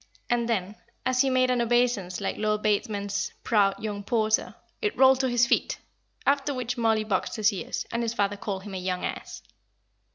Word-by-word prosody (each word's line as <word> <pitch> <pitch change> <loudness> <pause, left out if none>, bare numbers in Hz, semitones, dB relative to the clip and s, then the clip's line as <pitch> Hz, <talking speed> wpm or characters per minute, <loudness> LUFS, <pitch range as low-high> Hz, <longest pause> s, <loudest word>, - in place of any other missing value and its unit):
And 240 -1 +1
then, 205 -1 -1 0.3
as 255 0 +3
he 270 - +2
made 255 -1 +3
an 245 -1 +1
obeisance 235 -6 +1
like - - -2
Lord 210 0 -1
Bateman's 205 -1 -1
"proud 205 -4 +2
young 205 -2 -3
porter," 220 0 +1 0.3
it 425 -2 -1
rolled 265 0 +6
to 260 -1 +1
his 240 0 +4
feet; 235 - +1 0.5
after 280 0 +1
which 250 -1 -2
Mollie 225 -3 +2
boxed 200 -4 -1
his 215 0 +2
ears, 190 - -4
and 235 - -1
his 230 0 -2
father 205 -2 +1
called 200 -2 -4
him 205 -1 -8
a 190 - -3
young 180 0 -2
ass. - - -6
220 Hz, 190 wpm, -27 LUFS, 205-245 Hz, 0.5 s, rolled